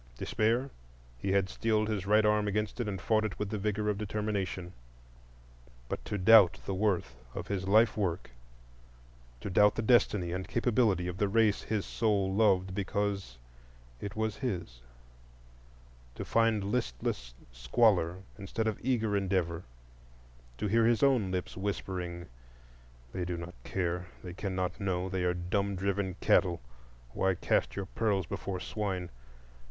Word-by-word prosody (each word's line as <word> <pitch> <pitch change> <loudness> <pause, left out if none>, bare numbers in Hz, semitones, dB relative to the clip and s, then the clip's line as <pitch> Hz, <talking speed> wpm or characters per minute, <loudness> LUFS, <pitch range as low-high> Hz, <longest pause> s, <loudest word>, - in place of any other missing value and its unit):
Despair? 115 - 0 0.5
He 95 - -1
had 100 -1 +3
steeled 110 +1 0
his 100 -3 -2
right 105 +1 +5
arm 105 0 +3
against 105 +3 -2
it, 120 - -1
and 100 -2 -3
fought 110 +3 +2
it 110 -3 -3
with 105 -1 -3
the 105 - -2
vigor 105 +1 -1
of 105 -1 0
determination. 100 -4 -3 1.1
But - - -4
to 105 - -2
doubt 100 -1 +7
the 100 - -2
worth 95 - 0 0.2
of - - -5
his 95 -2 -2
life 110 +3 +5
work,—to - - -8
doubt 105 +3 +5
the 115 - -2
destiny 105 -6 +3
and 95 +1 -3
capability 115 -7 +2
of 90 +1 -5
the 105 - +2
race 110 -1 +3
his 105 -2 -2
soul 100 -4 +1
loved 95 -3 +3
because 100 -6 -2 0.6
it 100 +2 -6
was 110 -1 -1
his; 90 - -4 1.3
to - - -5
find 115 -3 +2
listless 65 - -2 0.2
squalor 90 - +2 0.2
instead 100 +3 -3
of 110 -3 -1
eager 110 -5 +1
endeavor; 90 -4 0 0.9
to - - -3
hear 115 +2 +3
his 120 0 +2
own 130 -8 +3
lips 90 -1 -3
whispering, 90 -3 -4 0.9
"They 90 - -2
do 90 0 -3
not 85 +1 -7
care; 90 -1 -2 0.2
they 90 -2 -7
cannot 95 0 -3
know; 95 -2 -1
they 95 -1 -1
are 90 0 +1
dumb 100 +3 -1
driven 95 -1 -1
cattle,—why - - 0
cast - - 0
your 100 - -3
pearls 100 -3 0
before 95 +2 -4
swine?" 95 -3 -3
95 Hz, 145 wpm, -31 LUFS, 90-105 Hz, 1.3 s, doubt